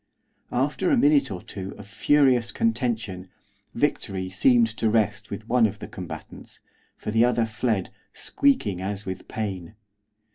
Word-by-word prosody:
After - - +1
a 285 - +4
minute 145 - +4
or 90 -3 -6
two 95 -1 -7
of 105 - -10
furious 125 +3 +3
contention, 115 - -1 0.5
victory 100 -8 -1
seemed 120 +5 +4
to 110 - +1
rest 105 -1 0
with 105 +2 -7
one 120 -1 +4
of 105 0 -7
the - - -8
combatants, - - -9 0.4
for - - -5
the 110 +2 +4
other 120 -1 +2
fled, 110 -3 -1 0.2
squeaking 110 - 0
as 100 +1 -4
with 95 0 -6
pain. 100 -3 -5
110 Hz, 145 wpm, -25 LUFS, 100-125 Hz, 0.5 s, a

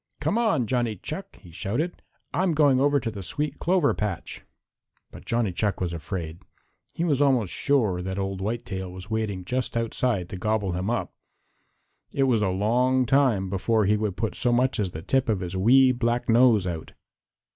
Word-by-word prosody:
"Come - - 0
on, 195 - +2
Johnny 120 -2 0
Chuck," - - -7
he 85 - -16
shouted. 125 - -3 0.3
"I'm 180 -2 +1
going 145 -4 +4
over 145 +1 +3
to 115 -3 -3
the 100 -2 -7
sweet 145 - -2
clover 175 -4 +2
patch." 105 -5 -4 0.7
But - - -12
Johnny 115 -4 0
Chuck 105 +2 -1
was 90 -2 -2
afraid. 85 0 -5 0.6
He 165 - -1
was 145 -5 +1
almost 130 -9 +2
sure 110 -11 +1
that 95 +1 -4
Old 95 -1 -3
Whitetail 95 -3 -4
was 95 +4 -10
waiting 105 -4 -2
just 125 +2 -2
outside 115 -4 -1
to 95 - -6
gobble 105 0 0
him 90 +4 -2
up. 120 - -2 1.0
It 135 - +2
was 125 -5 +2
a 100 - +1
long 125 +7 +2
time 125 -7 +2
before 105 +3 +1
he 105 +2 +3
would 105 -3 -2
put 110 -2 -2
so 125 - 0
much 125 +1 +2
as 100 -3 0
the 80 -2 -8
tip 135 -2 +1
of 105 -4 +1
his 90 0 -5
wee 130 +7 +5
black 120 -1 -1
nose 115 -4 +5
out. 85 -3 -5
110 Hz, 185 wpm, -25 LUFS, 95-130 Hz, 1.0 s, wee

